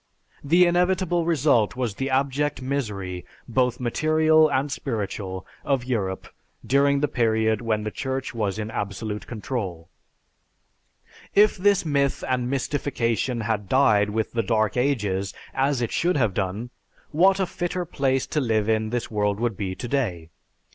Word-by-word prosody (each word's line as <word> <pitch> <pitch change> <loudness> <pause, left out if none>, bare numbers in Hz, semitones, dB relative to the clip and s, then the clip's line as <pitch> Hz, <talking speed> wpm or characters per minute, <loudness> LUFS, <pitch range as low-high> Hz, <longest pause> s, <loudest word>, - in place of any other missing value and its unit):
The 170 +5 +5
inevitable 175 -1 +1
result 140 -7 +2
was 125 -4 -2
the 135 +6 -3
abject 140 +1 0
misery, 105 -10 -3 0.2
both 125 0 +1
material 155 +5 +3
and 135 +1 0
spiritual, 100 -7 -4 0.2
of 135 -3 0
Europe 100 -7 -2 0.4
during 140 +1 +3
the 150 - +2
period 110 -4 +1
when 110 -2 -1
the 105 - -3
Church 130 +2 -3
was 105 -3 -2
in 110 0 -4
absolute 105 +1 -4
control. 105 - -5 1.5
If 210 +1 +6
this 200 -1 +2
myth 140 -3 0
and 125 -1 0
mystification 125 -4 -1
had 105 -3 -2
died 105 -6 +4
with 110 +1 -2
the 115 - 0
dead 110 -1 +1
ages, 105 -8 0 0.2
as 135 -1 +1
it 115 - -2
should 175 -1 +1
have 110 -7 +1
done, 100 +6 -3 0.4
what 190 +5 +4
a 190 - +2
fitter 175 0 -3
place 135 -5 0
to 150 - -1
live 110 -4 +1
in 110 -1 +1
this 120 0 -3
world 105 -1 0
would 120 -2 0
be 95 -1 -3
today! 115 - -2
125 Hz, 145 wpm, -24 LUFS, 105-140 Hz, 1.5 s, If